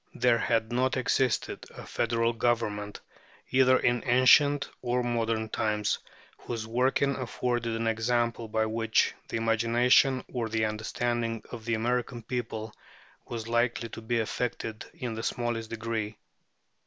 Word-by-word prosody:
There 120 -2 +3
had 115 -1 0
not 130 +2 +1
existed 130 -1 0
a - - -9
federal 115 0 0
government, 110 -3 -1 0.5
either 130 0 +5
in 120 -1 +1
ancient 140 +3 +5
or 125 0 0
modern 115 -2 0
times, 105 -2 0 0.4
whose 115 -2 -5
working 130 +4 +1
afforded 120 -2 -2
an 115 0 -2
example 115 +1 0
by 110 0 +1
which 115 0 +1
the - - -2
imagination 120 +3 +3
or 120 -3 -2
the 110 0 +1
understanding 115 +1 -2
of 115 -3 -8
the 115 -1 +1
American 120 +1 -1
people 110 -3 -4 0.5
was 115 -1 -5
likely 120 0 0
to 115 - -8
be 115 +1 0
affected 110 -1 -3
in 120 -3 -4
the 110 - -4
smallest 115 -1 -2
degree. 110 -2 -3
115 Hz, 135 wpm, -28 LUFS, 110-120 Hz, 0.5 s, either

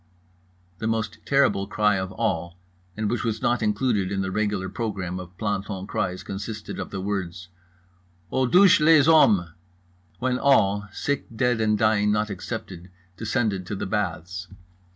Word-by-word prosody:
The 110 - -2
most 110 -1 -2
terrible 130 -8 +3
cry 105 -2 +2
of 95 0 -3
all, 85 -6 -2 0.4
and 110 -1 -1
which 120 +1 -1
was 115 -2 -1
not 120 0 +2
included 105 -2 0
in 95 -1 -1
the 95 0 -2
regular 105 -2 -1
program 95 -5 -4
of 90 0 -11
planton 105 -2 -3
cries, 95 -2 -3
consisted 105 +2 -6
of - - -5
the 95 - -5
words: 90 -3 -4 0.8
"Aux 130 -1 +1
douches 190 +7 +6
les 155 -2 +6
hommes"—when 90 - +1
all, 100 -7 +3
sick, 145 +7 -2
dead 125 -1 +1
and 105 -1 +2
dying 105 -1 +3
not 105 0 0
excepted, 95 -3 -6 0.3
descended 105 -3 -1
to 105 - -3
the - - -4
baths. 90 -2 -3
105 Hz, 150 wpm, -25 LUFS, 95-115 Hz, 0.8 s, douches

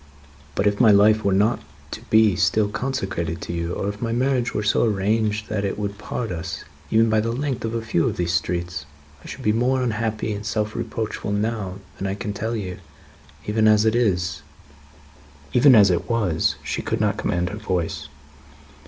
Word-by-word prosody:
But, 100 - 0
if 105 +2 +2
my 115 - +7
life 105 +1 +5
were 100 - +2
not 105 +5 +2 0.3
to - - -6
be 110 -3 +5
still 105 +3 +2
consecrated 95 -10 -3
to - - -5
you, 85 0 -2
or 100 - -3
if 100 +1 -5
my 115 -1 -1
marriage 125 0 +1
were 105 - -2
so 105 - +2
arranged 105 0 +1
as - - -20
that 105 -2 -1
it 100 - -2
would 100 -1 -4
part 110 +1 -4
us, 90 +1 -5 0.3
even 115 +1 +4
by 110 -1 +3
the 115 +2 0
length 135 0 -2
of 115 +1 -3
a 115 - -2
few 110 -7 +1
of - - -2
these 85 -1 0
streets, 85 -1 -2 0.4
I - - -11
should - - -8
be 105 - +3
more 125 +4 +1
unhappy 110 -2 -1
and 100 0 -5
self 105 +1 -2
reproachful 110 -2 -3
now 105 -3 -2 0.2
than 95 - -2
I 95 - -2
can 105 0 -4
tell 110 +3 -3
you. 95 -5 -5 0.7
Even 110 +1 +2
as 105 0 +5
it 110 - +3
is 90 -9 0 0.5
" 75 -1 -25
Even 130 +1 +7
as 100 -3 +7
it 85 - -1
was, 105 -9 +1
she - - -3
could - - -2
not - - +1
command 90 0 -1
her 105 - -6
voice. 85 -6 -2
105 Hz, 205 wpm, -23 LUFS, 90-115 Hz, 0.7 s, my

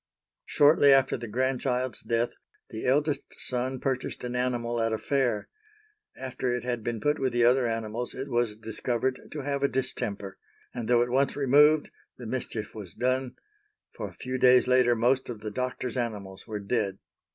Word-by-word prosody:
Shortly 145 -1 +5
after 135 -1 +4
the 120 -1 -6
grandchild's 130 +2 -1
death 115 +1 0 0.4
the 110 - -4
eldest 145 +3 0
son 130 +1 -2
purchased 130 -2 -2
an 125 0 -4
animal 120 -2 -1
at 115 0 +1
a - - 0
fair; 125 -5 0 0.7
after 130 -1 -3
it 120 0 -2
had 120 -2 -2
been 115 -1 -2
put 150 +7 +1
with 130 -2 0
the 120 -1 +3
other 125 0 +4
animals 115 +1 -3
it 135 +2 -5
was 120 -4 0
discovered 120 +3 -2
to 150 - -4
have 140 0 -2
a 140 - +4
distemper, 100 -7 -3 0.3
and, 120 -3 -4
though 120 -1 +4
at 120 - -4
once 135 +1 +2
removed 145 +2 +4 0.3
the 125 - -9
mischief 110 -2 -4
was 100 -6 -9
done, 130 0 0 0.6
for - - -5
a - - -16
few 130 0 -4
days 125 0 +6
later 125 -1 +4
most 125 +4 +1
of 115 -4 -6
the 105 - -5
doctor's 125 +2 -3
animals 100 -5 -4
were 105 -1 -4
dead. 100 -2 -1
125 Hz, 175 wpm, -28 LUFS, 115-130 Hz, 0.7 s, days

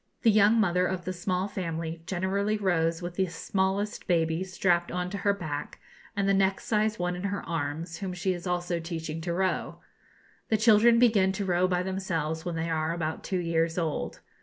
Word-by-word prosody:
The 225 - +6
young 215 +2 +5
mother 180 -3 +3
of 180 -1 -3
the 185 - -2
small 185 +1 -1
family 165 -4 -4
generally 200 +3 0
rows 170 -4 +1
with 175 0 -6
the 190 -1 +2
smallest 195 +4 -1
baby 165 0 +1
strapped 180 -2 +1
on 180 0 -2
to 200 - -4
her 200 - +3
back, 150 -7 -5 0.4
and 200 -1 0
the 195 - +4
next 195 0 +2
sized 215 0 +1
one 180 0 -1
in 180 +2 -5
her 200 0 -3
arms, 165 +1 -3
whom 195 -2 -4
she 180 +1 -1
is 175 +1 -6
also 175 -1 -1
teaching 165 -1 -5
to 170 +1 -3
row. 185 +2 -1 0.7
The 220 - +3
children 225 +1 +6
begin 215 -6 +4
to 200 +1 -3
row 180 0 +2
by 180 -1 0
themselves 165 -4 -2
when 175 -2 -3
they 165 0 -2
are 160 +1 0
about 160 -2 -3
two 190 - -1
years 165 -1 0
old. 165 -4 -2
180 Hz, 195 wpm, -28 LUFS, 165-195 Hz, 0.7 s, The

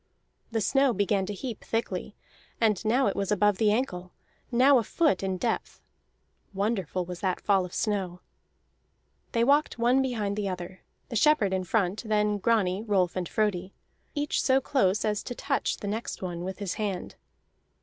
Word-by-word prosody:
The 225 -1 -1
snow 270 +3 +3
began 200 -1 +1
to 205 - -3
heap 235 +1 -6
thickly, 210 -3 -3 0.4
and 215 -4 +2
now 240 +5 +2
it 200 - +1
was 200 0 -2
above 205 -1 +3
the 215 -2 +4
ankle, 185 -6 -2 0.4
now 255 +2 +6
a - - -1
foot 310 - +1
in 190 -1 -1
depth; 230 +5 -2 0.8
wonderful 195 -4 -1
was 180 0 -7
that 185 -3 -1
fall 195 -3 +2
of 180 - -10
snow. 190 -5 -1 1.1
They 230 - +3
walked 285 +3 +3
one 245 +3 +3
behind 215 -6 -2
the 205 -2 -1
other, 180 0 -6 0.3
the 235 - -5
shepherd 225 -6 +4
in 185 -1 -1
front, 195 0 0
then 210 -2 +1
Grani, 200 -3 +1
Rolf, 195 -5 +1
and 180 -2 -3
Frodi, 195 -3 -1 0.4
each 290 0 0
so 265 0 +4
close 215 -8 +1
as 210 -1 0
to 245 - -6
touch - - -1
the 205 - -6
next 215 -1 -4
one 175 -1 -4
with 190 +1 -5
his 200 -4 -3
hand. 195 -4 -3
205 Hz, 170 wpm, -27 LUFS, 185-230 Hz, 1.1 s, now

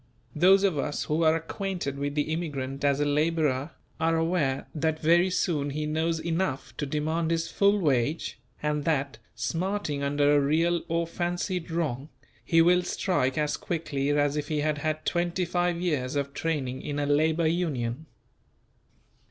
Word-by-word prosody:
Those 190 +5 +5
of 185 -7 +2
us 145 +1 -2
who 155 +2 0
are 160 0 +4
acquainted 165 -3 -3
with 145 0 -2
the 150 +1 0
immigrant 140 -5 -4
as 140 -1 +2
a 145 - +2
labourer 150 -2 +1 0.3
are 165 +1 +2
aware 160 -5 0
that 160 0 -1
very 170 +3 +4
soon 155 -5 0
he 150 +2 -3
knows 160 +2 0
enough 165 -4 -2
to 145 - -2
demand 160 +3 -1
his 165 0 0
full 200 +1 +3
wage, 145 - 0 0.2
and 150 -1 0
that, 140 -7 0 0.2
smarting 165 - -2
under 145 +1 +3
a - - +5
real 165 +4 +2
or 170 +1 0
fancied 175 +1 -3
wrong 155 -4 -2 0.3
he 165 -1 +4
will 180 +1 +5
"strike" 155 -8 0
as 150 -1 0
quickly 150 -5 -2
as 145 0 +2
if 150 -1 -2
he 150 -1 -1
had 150 0 0
had 155 +1 -2
twenty 175 +1 0
five 175 0 0
years 150 -7 -1
of 140 -1 -2
training 140 -5 -2
in 145 -1 -4
a 145 - 0
Labour 155 +3 +2
Union. 155 -5 -1
155 Hz, 165 wpm, -27 LUFS, 145-170 Hz, 0.3 s, Those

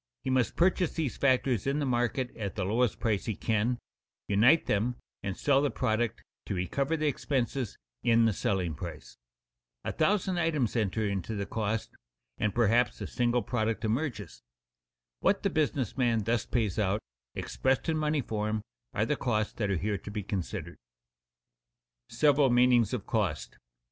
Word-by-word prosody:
He 130 - -1
must 130 -2 +1
purchase 180 -1 +2
these 155 -6 -2
factors 130 -4 +2
in 140 +1 +1
the 145 - 0
market 125 0 0
at 100 -3 -4
the 100 -4 -1
lowest 115 +3 +1
price 105 -4 0
he 110 - -2
can, 115 +4 0 0.5
unite 115 +11 +5
them 115 +4 +1 0.3
and 95 -1 -4
sell 140 -1 +3
the 145 - +2
product 115 -1 -1 0.2
to 100 - -2
recover 135 - 0
the 155 - -1
expenses 135 -4 -1 0.2
in 115 -1 +4
the 110 - +3
selling 90 -3 -1
price. 80 -5 -8 0.6
A - - -2
thousand 185 +1 +1
items 155 -9 +1
enter 110 -1 0
into 100 +2 -3
the 100 -1 -2
cost 110 +1 -2 0.5
and 105 -2 0
perhaps 120 +1 +3
a - - -4
single 120 -1 +1
product 115 0 -1
emerges. 110 - -2 0.8
What 195 - +2
the 200 - +1
business 145 - 0
man 120 -4 +2
thus 115 +1 0
pays 110 -6 0
out, 105 +1 +1 0.3
expressed 130 +3 0
in 160 - +1
money 150 -1 +1
form, 110 -2 -2 0.3
are 105 +1 +2
the 150 - +1
costs 110 -6 -1
that 105 -4 -2
are 95 - +1
here 100 +3 -1
to 105 - -9
be 105 -1 -4
considered. 95 -3 -4 1.3
[Sidenote: - - -11
Several 145 -2 +5
meanings 120 -2 +4
of - - -6
cost] - - -1
2. - - -24
115 Hz, 170 wpm, -29 LUFS, 105-135 Hz, 1.3 s, unite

